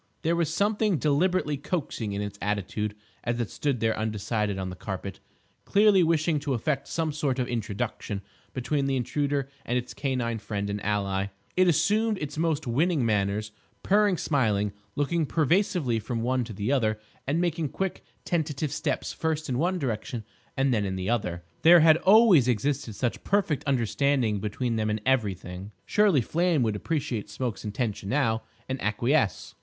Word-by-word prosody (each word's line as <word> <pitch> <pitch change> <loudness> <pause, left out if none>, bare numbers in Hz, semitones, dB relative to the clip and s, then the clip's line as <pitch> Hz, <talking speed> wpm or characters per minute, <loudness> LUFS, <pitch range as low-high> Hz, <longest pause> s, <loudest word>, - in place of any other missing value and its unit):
There 165 +2 +2
was 170 -2 0
something 205 +1 +1
deliberately 150 +1 +1
coaxing 135 - -3
in 100 +1 -2
its 100 0 -6
attitude 105 +1 -2 0.3
as 120 0 -1
it 120 - -2
stood 140 -5 -1
there 110 -1 +2
undecided 105 -1 -1
on 95 -1 -3
the - - -7
carpet, 95 0 -6 0.4
clearly 205 -2 +5
wishing 160 -2 +2
to 140 -2 -1
effect 135 +4 -1
some 160 -2 -1
sort 145 -3 -1
of 125 -2 0
introduction 105 -3 -3 0.3
between 135 +2 -1
the 135 - +1
Intruder 140 +2 -1 0.2
and 120 - 0
its 125 0 -4
canine 125 -5 -1
friend 100 -1 -3
and 100 0 -4
ally. 100 -2 0 0.3
It 185 0 +4
assumed 210 +7 +2
its 150 -5 -5
most 160 -1 0
winning 145 +3 +1
manners, 105 0 0 0.3
purring, 205 -2 +3
smiling, 105 -10 +1 0.2
looking 155 +2 0
persuasively 160 - +1
from 115 +1 -3
one 125 +1 +1
to 110 - -8
the 105 +5 -2
other, 110 -6 +1 0.3
and 150 +5 +1
making 165 -3 0
quick 190 +5 -3 0.2
tentative 155 -4 -1
steps - - -2
first 160 -1 -2
in 125 -1 0
one 180 +4 +1
direction 120 -4 -3 0.3
and 135 -1 +2
then 105 -3 +1
in 95 -1 -2
the 95 +3 -2
other. 90 -7 -1 0.2
There 170 +1 +8
had 160 0 +7
always 190 - +6
existed 125 -1 0
such 120 +1 -2
perfect 190 -8 +1
understanding 130 -3 +1
between 115 +3 -2
them 110 0 0
in 105 +1 0
everything. 100 -6 -1
Surely 205 -10 +4
Flame 165 +2 +1
would 110 -2 0
appreciate 120 -4 -2
Smoke's 115 +2 -4
intention 105 -2 -3
now, 115 -4 +1 0.3
and 130 0 -3
acquiesce. 115 +2 +1
130 Hz, 165 wpm, -27 LUFS, 105-160 Hz, 0.4 s, There